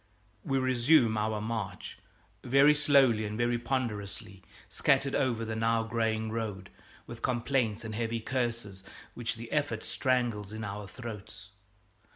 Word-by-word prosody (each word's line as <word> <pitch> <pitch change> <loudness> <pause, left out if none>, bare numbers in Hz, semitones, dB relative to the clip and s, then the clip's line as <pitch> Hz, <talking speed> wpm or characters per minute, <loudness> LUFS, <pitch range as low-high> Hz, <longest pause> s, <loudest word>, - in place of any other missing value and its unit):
We 135 - 0
resume 130 -1 +4
our 110 0 0
march, 105 -3 -4 0.4
very 140 +4 +6
slowly 140 -6 +4
and 105 0 -4
very 120 0 +1
ponderously, 105 -6 -3 0.3
scattered 135 0 +2
over 120 -4 +1
the 110 0 -3
now 115 0 +2
graying 110 -1 -1
road, 105 -4 -4 0.3
with - - -9
complaints 120 -3 0
and 110 - -5
heavy 115 +1 -1
curses 115 -5 -3 0.3
which 120 -1 -3
the 115 0 -9
effort 145 -7 0
strangles 120 -6 0
in 110 0 -6
our 100 0 -5
throats. 105 -2 -9
115 Hz, 135 wpm, -30 LUFS, 105-125 Hz, 0.4 s, very